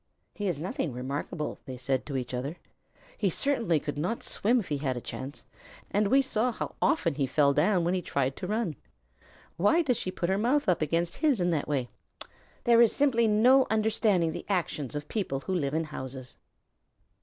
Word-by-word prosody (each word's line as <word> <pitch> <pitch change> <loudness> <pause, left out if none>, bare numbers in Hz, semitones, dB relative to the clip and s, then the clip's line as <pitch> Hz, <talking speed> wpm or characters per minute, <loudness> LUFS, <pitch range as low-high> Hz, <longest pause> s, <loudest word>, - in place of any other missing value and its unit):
"He 205 - -3
is 170 -6 -1
nothing 165 -3 -3
remarkable," 140 +5 -4
they 130 -1 -6
said 130 +1 -1
to 140 -3 -2
each 125 -1 -4
other. 135 +6 -3 0.6
"He 200 - +2
certainly 230 - +1
could 145 0 -4
not 180 +9 -2
swim 240 +5 +1
if 205 - -6
he 145 -2 -1
had 130 -3 -1
a - - -2
chance, 130 +3 -7 0.5
and 205 0 +2
we 270 +6 +4
saw 250 -1 0
how - - -5
often 170 -4 +2
he 140 -1 0
fell 140 +1 +3
down 175 +5 +3
when 175 +2 +1
he 185 - 0
tried 135 -4 -1
to 180 - -5
run. 210 -6 -1 0.8
Why 205 - +4
does 250 -6 +1
she - - -3
put 185 -1 -2
her 190 +1 +1
mouth 265 +7 +2
up 180 -3 +2
against 165 +3 0
his 295 -8 +2
in 175 0 +2
that 155 -4 -1
way? 135 -4 0 0.8
There 235 0 +6
is 235 - +4
simply 250 -5 +3
no 250 +5 +5
understanding 215 -5 +2
the - - -7
actions 155 - -1
of 145 0 -4
people 160 -11 -2
who 190 - -3
live 150 -5 0
in 165 - +1
houses." 130 -4 -7
175 Hz, 200 wpm, -29 LUFS, 140-220 Hz, 0.8 s, There